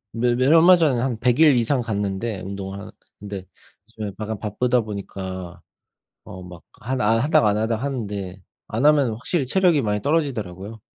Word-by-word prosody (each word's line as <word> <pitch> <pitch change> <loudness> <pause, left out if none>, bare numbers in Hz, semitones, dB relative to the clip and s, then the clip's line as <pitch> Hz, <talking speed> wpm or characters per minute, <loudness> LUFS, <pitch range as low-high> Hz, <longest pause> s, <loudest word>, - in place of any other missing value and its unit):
매 120 +1 +1
매 130 +2 +1
얼마 165 +4 +7
전에 145 -8 +2
한 125 -3 -2
100 125 +3 +1
일 150 -5 +6
이상 120 +2 +1
갔는데 100 -1 -3
운동을 95 +1 -6
하러 100 - -10 0.3
근데 100 -2 -7 0.4
요즘에 110 -3 -6
약간 110 -1 -4
바쁘다 120 +4 0
보니까 95 -4 -7 0.6
어 90 - -10
막 90 -1 -12 0.2
한 130 +4 -3
아 115 +2 +3
하다가 140 -6 +3
안 105 - 0
하다가 110 +1 -1
하는데 100 -8 -5 0.3
안 115 +7 0
하면 145 -5 +4
확실히 135 +6 -2
체력이 175 -1 +3
많이 105 -2 -1
떨어지더라고요. 110 - -2
110 Hz, 345 characters per minute, -22 LUFS, 100-130 Hz, 0.6 s, 얼마